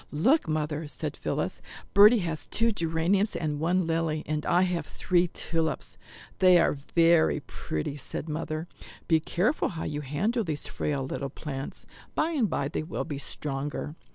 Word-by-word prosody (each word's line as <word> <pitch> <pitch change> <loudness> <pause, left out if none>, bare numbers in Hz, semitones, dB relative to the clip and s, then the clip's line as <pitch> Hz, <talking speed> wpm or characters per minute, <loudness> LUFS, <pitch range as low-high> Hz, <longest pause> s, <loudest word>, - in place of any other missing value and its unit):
"Look, 240 - +3
Mother," 155 0 -1
said - - -4
Phillis, - - -2 0.3
"Bertie 210 +3 +8
has 155 -3 -4
two 230 +1 +2
geraniums 175 +3 +1
and 150 -3 -2
one 175 +3 +2
lily, 165 -1 0
and 150 0 -2
I 180 - +4
have 180 -2 -1
three 180 -1 +1
tulips." 165 -1 -2 0.4
"They 185 -1 +7
are 170 - +4
very 165 +3 +3
pretty," 80 - -4
said 145 - -5
Mother; 155 +1 -3 0.4
"be 160 -1 +4
careful 185 - 0
how 160 - -5
you 150 0 -3
handle 195 - 0
these 155 -5 -4
frail 140 -3 -2
little 135 +1 -3
plants. 135 -1 -6 0.3
By 315 +2 +1
and 260 - +1
by 140 - 0
they 155 - -2
will 155 +2 -4
be 145 -4 -5
stronger." 145 +1 -4
160 Hz, 160 wpm, -28 LUFS, 150-180 Hz, 0.4 s, Bertie